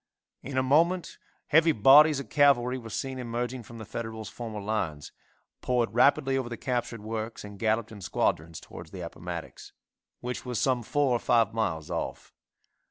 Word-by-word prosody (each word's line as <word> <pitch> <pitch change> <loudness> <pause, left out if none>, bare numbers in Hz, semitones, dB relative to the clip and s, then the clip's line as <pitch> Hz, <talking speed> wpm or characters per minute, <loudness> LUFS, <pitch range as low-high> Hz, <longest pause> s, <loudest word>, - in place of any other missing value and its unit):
In 135 -1 -5
a 130 - +3
moment 165 +6 +2 0.3
heavy 160 +1 +5
bodies 145 +6 +7
of 140 - -7
cavalry 130 -4 +4
were 115 -2 -9
seen 130 +4 -4
emerging 120 +1 -3
from 115 +1 -12
the 110 - -8
Federals' 110 0 -6
former 115 -3 -6
lines, 100 -9 -3 0.5
poured 120 -4 0
rapidly 135 +2 +3
over 125 -2 -4
the 120 - -5
captured 120 -3 -3
works 110 +1 -5
and 105 -1 -10
galloped 110 0 0
in 105 -2 -10
squadrons 80 -2 -1
towards - - -11
the - - -8
Appomattox, - - -7 0.5
which 125 0 -5
was 125 -3 -3
some 130 -2 +2
four 140 +3 +1
or - - 0
five 115 -3 +2
miles 90 -9 -2
off. - - -4
120 Hz, 165 wpm, -28 LUFS, 110-135 Hz, 0.5 s, bodies